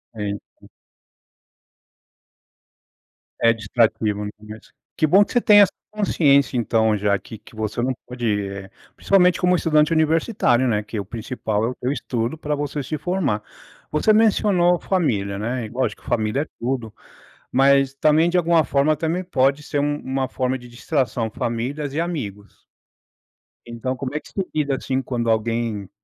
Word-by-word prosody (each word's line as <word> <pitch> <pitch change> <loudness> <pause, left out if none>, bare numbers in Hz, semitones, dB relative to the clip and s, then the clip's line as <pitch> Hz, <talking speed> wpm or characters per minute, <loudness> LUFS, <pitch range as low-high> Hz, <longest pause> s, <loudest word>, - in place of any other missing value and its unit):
Então 105 -1 -7 2.7
É 115 0 +5
distrativo, 110 -1 0
no 105 - -5
começo. 105 +1 -13 0.2
Que 155 - +2
bom 195 +7 +6
que - - -10
você 245 - +4
tenha 205 -2 +7
essa 195 - +1 0.2
consciência 145 -11 +2
então, 110 -2 +2
já 100 0 +1
que 110 - -11
que 110 - -18
você 110 +2 -3
não 130 +1 0
pode, 125 -1 -5 0.2
eh, 100 0 -8 0.3
principalmente 180 -2 +3
como 180 0 +3
estudante 155 -1 +2
universitário, 160 - +2
né. 105 -3 +1
Que 110 +1 -7
é - - -1
o 100 - -4
principal 110 -1 -3
é - - 0
o 125 - -6
teu 125 - -2
estudo 120 -1 -2
pra 150 -1 -2
você 145 0 -3
se 155 +4 -4
formar. 150 - -1 0.5
Você 150 +8 +3
mencionou 200 -5 +3
família, 105 - -1
né, 120 +3 -3
e - - -12
lógico 120 -2 -2
família 110 +3 0
é 155 - -3
tudo, 120 -3 -3 0.6
mas 135 +1 +3
também 155 +4 +3
de 180 - 0
alguma 170 -2 +3
forma, 140 +3 +2
também 165 +4 -1
pode 140 -3 +1
ser 145 - -3
um 145 +1 0
uma 130 0 -2
forma 130 0 -1
de 120 0 -13
distração 120 -2 -2
famílias 135 +6 -3
e 160 - 0
amigos. 105 - -5 1.0
Então, 120 +2 -4
como 130 +1 -5
é 150 - 0
que - - -16
você 195 -2 -2
lida, 145 -3 0
assim, 130 0 -2
quando 120 -3 -2
alguém 110 -3 -1
130 Hz, 165 wpm, -22 LUFS, 115-155 Hz, 2.7 s, tenha